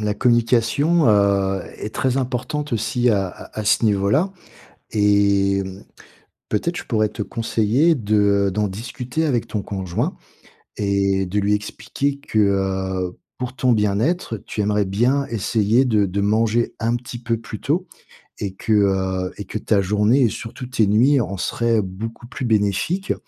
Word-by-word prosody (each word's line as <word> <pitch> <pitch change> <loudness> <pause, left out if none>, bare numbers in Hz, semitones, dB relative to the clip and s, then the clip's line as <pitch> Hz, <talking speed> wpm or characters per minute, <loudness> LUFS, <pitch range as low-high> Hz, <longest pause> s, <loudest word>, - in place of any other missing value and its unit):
la 105 -1 -1
communication, 120 +7 +2
heu, 100 -2 +3 0.2
est 105 - -7
très 130 0 0
importante 130 +2 -2
aussi 120 +2 +1
à 100 -3 +1
à 110 - -9
à - - -4
ce 110 +2 +3
niveau-là, 105 - +2 0.6
et 100 -2 +3
hem, 95 0 -6 0.7
peut-être, 170 +12 -1
je - - -5
pourrais 110 -3 +1
te 105 - -6
conseiller 115 +9 +1
de, 100 -4 +2
heu, - - -1
d'en 105 +2 0
discuter 125 +8 -4
avec 125 -7 0
ton 105 - -3
conjoint, 95 -3 -3 0.6
et 100 -1 +1
de 95 +3 -1
lui 100 +1 +1
expliquer 140 +6 -2
que, 125 -6 -2
heu, 95 -2 0 0.2
pour 125 0 -4
ton 125 -2 +2
bien-être, 110 - 0
tu 105 - -3
aimerais 105 0 +1
bien 125 +9 +1
essayer 115 +2 +2
de 105 -4 +2
de 100 +2 -2
manger 110 +3 +1
un 115 +1 +1
petit 120 0 -7
peu 115 -1 -1
plus 110 -1 -8
tôt 170 +7 0 0.5
et 95 -2 -3
que, 110 - -1
heu, 95 -2 +1
et 105 - -6
que 100 - -5
ta 105 -1 +1
journée 105 +7 +2
et, 115 - +4
surtout, 120 +4 -7
tes 115 -4 +2
nuits 125 +7 +4
en 100 -2 -4
seraient 115 +2 +1
beaucoup 110 +5 -7
plus 130 0 -7
bénéfiques. 110 - +1
105 Hz, 160 wpm, -21 LUFS, 100-120 Hz, 0.7 s, et